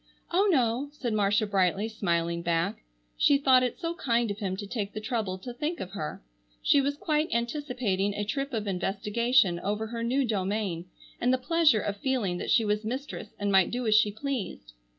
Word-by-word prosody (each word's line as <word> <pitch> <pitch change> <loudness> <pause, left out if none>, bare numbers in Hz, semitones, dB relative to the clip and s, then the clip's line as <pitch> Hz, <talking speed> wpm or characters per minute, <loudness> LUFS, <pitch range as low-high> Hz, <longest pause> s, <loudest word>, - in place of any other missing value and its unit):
"Oh, 390 +4 +3
no!" 255 -1 +1
said 250 -6 -3
Marcia 210 0 +2
brightly, 195 0 +1
smiling 170 -6 -1
back. 170 +4 0 0.4
She 285 - +5
thought 265 -2 +5
it 250 -1 -1
so 335 -1 -2
kind 235 - 0
of 205 - -6
him 190 -3 -2
to 205 - -5
take 205 -1 -4
the - - -4
trouble 215 -4 -2
to 240 +6 -8
think 305 +6 -3
of 185 - -6
her. 155 - -5 0.4
She 285 - +5
was 285 +1 -1
quite 305 0 0
anticipating 235 -6 -1
a 205 - -2
trip 275 +7 -2
of 220 -4 -2
investigation 205 +1 +1
over 210 +4 -2
her 230 +1 -5
new 255 +4 +1
domain, 195 -4 -1 0.4
and 245 - +3
the 260 - +3
pleasure 295 -3 +3
of 205 0 -3
feeling 205 -8 -1
that - - -4
she 225 - +4
was 210 +1 0
mistress 250 -1 -5
and 205 -1 -1
might 190 -2 +5
do 245 0 -3
as 215 - +3
she 215 -1 +5
pleased. 220 - -5
220 Hz, 195 wpm, -28 LUFS, 200-255 Hz, 0.4 s, She